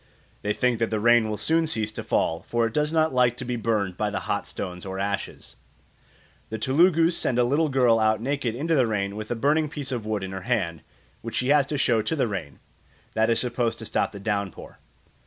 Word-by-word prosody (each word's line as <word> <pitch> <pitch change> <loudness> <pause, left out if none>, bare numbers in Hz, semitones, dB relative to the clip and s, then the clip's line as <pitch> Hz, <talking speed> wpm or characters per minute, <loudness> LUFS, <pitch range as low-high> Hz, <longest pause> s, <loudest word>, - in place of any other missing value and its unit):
They 105 - -1
think 120 +1 +1
that 115 - +1
the 110 - -1
rain 120 0 +4
will 105 - -2
soon 160 +5 +2
cease 110 -8 0
to - - -6
fall, 80 +1 0
for 120 -1 +1
it 115 - -3
does 150 +2 +1
not 160 -2 +2
like 125 -1 +3
to 125 - -5
be 125 0 -2
burned 105 -5 -1
by 105 - 0
the 105 - -3
hot - - -2
stones 90 -1 -6
or 95 0 -5
ashes. 100 0 -4 0.9
The 110 - -4
Telugus 165 - +3
send 125 - 0
a 125 - +4
little 145 +6 +2
girl 125 -4 +3
out 110 -1 +2
naked 130 -1 -2
into 160 +6 -1
the 130 -6 +3
rain 100 -2 -2
with 110 0 -6
a 120 - -1
burning 150 +5 +1
piece 140 -2 -5
of 120 -4 -2
wood 105 -2 -2
in 95 - -5
her 95 0 -5
hand, 90 -8 -1 0.4
which - - -6
she 130 - 0
has 145 -2 +4
to 150 - -2
show 115 -4 +2
to 160 - -2
the 135 - +1
rain. 90 -9 -5 0.6
That 110 +1 +2
is 115 - +3
supposed 120 -2 -1
to - - -8
stop - - 0
the 100 - -9
downpour. 100 -2 -4
115 Hz, 230 wpm, -25 LUFS, 105-135 Hz, 0.9 s, rain